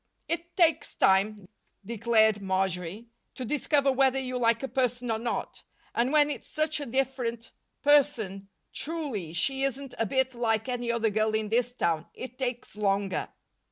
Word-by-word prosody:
"It 340 +2 -3
takes 330 -3 +3
time," 195 +1 +2 0.4
declared 220 -1 +3
Marjory, 190 +2 -2 0.3
"to 255 - -5
discover 280 +1 +2
whether 265 0 +3
you 255 -1 -3
like 230 0 +2
a - - -1
person 245 -2 -1
or 220 - 0
not. 235 +1 -3 0.3
And 240 +3 +1
when 300 -1 +4
it's - - -6
such 310 0 0
a 290 - -5
different 245 -2 -2 0.3
person 230 -10 +2 0.2
truly, 280 - -3
she 265 +11 +1
isn't 275 0 -2
a 225 - +1
bit 265 +2 +1
like 225 -1 0
any 245 -2 -1
other 230 -2 +1
girl 215 +1 +1
in 215 -1 -1
this 240 +2 +1
town 165 -6 0
it 255 0 -8
takes 250 -4 -3
longer." 200 -2 0
235 Hz, 160 wpm, -28 LUFS, 215-270 Hz, 0.4 s, when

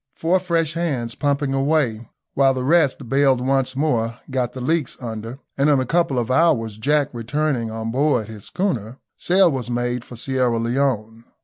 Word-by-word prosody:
Four 175 +3 +1
fresh 165 -3 0
hands 140 -9 -2
pumping 145 0 0
away 135 -5 0 0.2
while 135 -1 +3
the 130 - -2
rest 145 -3 +2
baled 135 0 +3
once 130 0 0
more 120 -6 0
got 125 -2 -1
the 130 - -7
leaks 150 +1 -1
under, 115 0 -6 0.2
and 140 +2 +4
in 145 -2 +4
a 130 - 0
couple 165 -2 +1
of 120 0 -1
hours, 115 -8 +2
Jack 145 +4 +2
returning 120 0 -1
on 110 0 -4
board 130 -4 +1
his 110 -3 -10
schooner, 130 - -2 0.2
sail 180 -1 +3
was 130 -3 -4
made 120 0 -1
for 125 - -11
Sierra 125 -1 0
Leone. 115 -2 -1
130 Hz, 175 wpm, -21 LUFS, 115-150 Hz, 0.2 s, and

